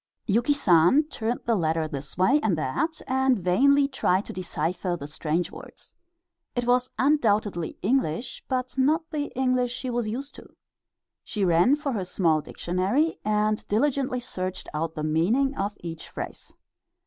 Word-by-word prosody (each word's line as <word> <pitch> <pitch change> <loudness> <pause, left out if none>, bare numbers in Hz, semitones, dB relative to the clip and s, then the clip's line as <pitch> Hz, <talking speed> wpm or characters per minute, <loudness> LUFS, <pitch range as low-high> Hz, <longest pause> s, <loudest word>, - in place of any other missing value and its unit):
Yuki 235 +6 +2
San 195 - +5
turned 235 -3 -2
the 235 - +2
letter 160 -4 0
this 145 0 -7
way 250 +11 +4
and 195 - +1
that, 305 - -2
and 265 -1 +2
vainly 275 +11 +4
tried 205 -8 +1
to - - -7
decipher 175 0 -2
the 140 - -6
strange 155 +3 -2
words. - - -12 0.6
It 245 -1 -1
was 250 +1 +2
undoubtedly 215 - +1
English, 235 - -1
but 255 0 -2
not 315 +5 +2
the 295 -2 -1
English 255 -2 +1
she 250 0 -4
was 240 -2 -1
used 270 +6 -5
to. - - -13 0.7
She 205 -3 -2
ran 175 +10 +4
for 295 -2 -3
her 200 -7 -2
small 165 -4 +1
dictionary 190 - -1
and 215 0 +1
diligently 255 +3 +1
searched 185 -7 -5
out 160 +1 -2
the 155 - -4
meaning 210 - +2
of 200 -1 -3
each 165 -2 -7
phrase. - - -7
215 Hz, 155 wpm, -26 LUFS, 175-265 Hz, 0.7 s, San